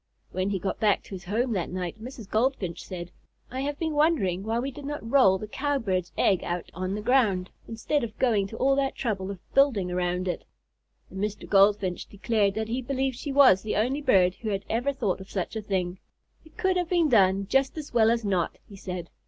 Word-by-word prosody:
When 185 +1 -1
he 200 - 0
got 190 +2 -3
back 210 -3 +2
to - - -16
his 185 -2 -7
home 230 +6 0
that 185 -6 -1
night, 180 +3 -5
Mrs. 245 -4 -8
Goldfinch 215 -6 -1
said: 175 -1 -7 0.4
"I 260 +1 -3
have 285 +1 -2
been 320 -1 -2
wondering 295 - +2
why 220 +3 -1
we 265 +3 -2
did 280 +2 -10
not 290 -5 -5
roll 230 -7 +5
the 215 - -7
Cowbird's 215 -9 -1
egg 190 -3 +3
out 175 0 -4
on 185 +3 -3
the 210 - -5
ground, 210 -8 +2 0.2
instead 235 +5 -1
of 220 -2 -6
going 215 -6 +2
to 225 - -9
all 270 +1 +3
that 275 -1 0
trouble 195 -6 -2
of 200 - -5 0.2
building 240 -10 +3
around 180 +1 -1
it." 180 - -2 0.7
And 190 - -7
Mr. 210 0 -3
Goldfinch 195 -2 +3
declared 205 -1 0
that 220 0 -2
he 245 +3 -1
believed 265 0 -1
she 280 +3 -5
was 270 -9 +6
the 215 - -3
only 255 +8 0
bird 190 -10 +4
who 220 - -3
had 200 -1 -2
ever 245 +5 +1
thought 210 -9 -2
of 190 - -11
such 190 +2 -3
a 220 - -2
thing. 185 -3 -2 0.4
"It 315 - -20
could 380 -4 +1
have 355 -2 -1
been 345 -3 +3
done 195 -4 +4
just 270 +6 +1
as 300 -4 -7
well 225 -2 +5
as 230 -1 +1
not," 185 -4 0
he 200 - -12
said. 180 -3 -6
215 Hz, 220 wpm, -27 LUFS, 190-265 Hz, 0.7 s, was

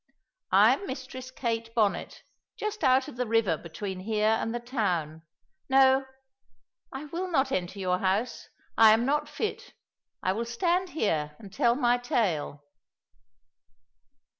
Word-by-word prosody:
I - - +6
am 400 - -5
Mistress 260 -1 -7
Kate 230 -3 -3
Bonnet, 215 -4 0 0.3
just 425 -3 -4
out 260 -1 +4
of - - -10
the 250 -1 -1
river 220 -6 +2
between 185 +4 -6
here 215 +2 0
and 225 - -2
the 240 - -3
town. 180 - -2 0.5
No, 265 0 +5 0.9
I 270 +3 -6
will 345 +5 -4
not 270 -5 +1
enter 185 -3 -2
your 180 -2 0
house, 195 +6 -1 0.3
I 220 -1 +7
am 230 +2 +2
not 295 +2 0
fit; 435 - -5 0.5
I 185 - +2
will 230 +4 -3
stand 350 +10 0
here 155 - -1
and 200 -3 -13
tell 235 +2 +2
my 245 -2 +2
tale." 175 -12 -1
235 Hz, 140 wpm, -28 LUFS, 195-265 Hz, 0.9 s, I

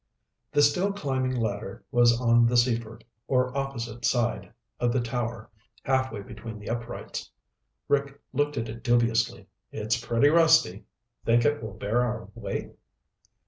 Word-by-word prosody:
The 145 - +4
steel 180 +7 +3
climbing 130 -8 -1
ladder 105 -4 -3
was 120 -2 +4
on 120 -1 +4
the 120 +1 +2
Seaford, 115 -2 0 0.2
or 125 0 +1
opposite 120 -4 -4
side, 120 -1 0 0.3
of 120 0 +2
the 130 - +1
tower 120 -2 -3 0.3
halfway 130 -5 0
between 110 +2 -9
the 105 +2 -6
uprights. 120 0 -5 0.6
Rick 140 0 0
looked 145 +2 0
at 115 0 -2
it 115 +2 -8
dubiously. 115 -2 +1 0.3
"It's 110 +2 -1
pretty 120 +4 +3
rusty. 160 - +4 0.4
Think 120 +1 +3
it 145 0 +2
will 110 - -7
bear 110 +4 0
our 120 -2 -2
weight?" - - -5
120 Hz, 140 wpm, -27 LUFS, 115-130 Hz, 0.6 s, The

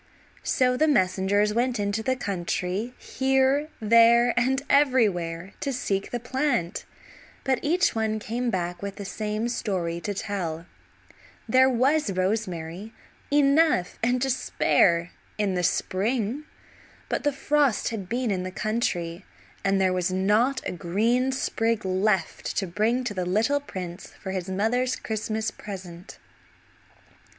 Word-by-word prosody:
So 250 -1 +2
messengers 205 -7 +2
went 240 +1 0
into 205 +1 -1
the 260 +3 0
country 195 +2 -3
here, 265 +3 +1
there, 230 +2 +5
and 260 +3 +1
everywhere 200 - +2
to 280 - -2
seek 200 -6 -2
the 240 - -3
plant, 245 - -1 0.6
but 265 -2 +1
each 350 +6 +2
one 220 -1 0
came 240 +3 -2
back 175 -3 -2
with 200 -1 -5
the 200 - -7
same 215 +3 -2
story 180 -8 -2
to 205 +2 -3
tell; 175 -5 -3 0.8
there 260 +3 +5
was 260 -1 +2
rosemary, 185 0 -2 0.4
enough 290 - +3
and 245 +2 +2
to 270 - +1
spare, 170 -8 +2 0.3
in 205 -2 0
the 180 - 0
spring, 225 - -1 0.6
but - - -2
the 290 - +2
frost 280 -3 +1
had 200 -5 -6
been 245 -1 0
in 185 -2 -1
the 185 - -4
country 185 -4 -2 0.4
and 195 0 +2
there 185 -1 +2
was 185 0 0
not 210 +8 +1
a - - -2
green 225 +10 +1
sprig 230 -4 -1
left 190 -1 0
to 195 - +1
bring 215 +8 0
to 240 -4 -3
the 185 -2 -2
little 220 +10 +2
prince 185 -9 -7
for 190 - -5
his 190 -1 -4
mother's 235 +7 +1
Christmas 220 0 -3
present. 185 -3 -9
215 Hz, 135 wpm, -26 LUFS, 185-250 Hz, 0.8 s, there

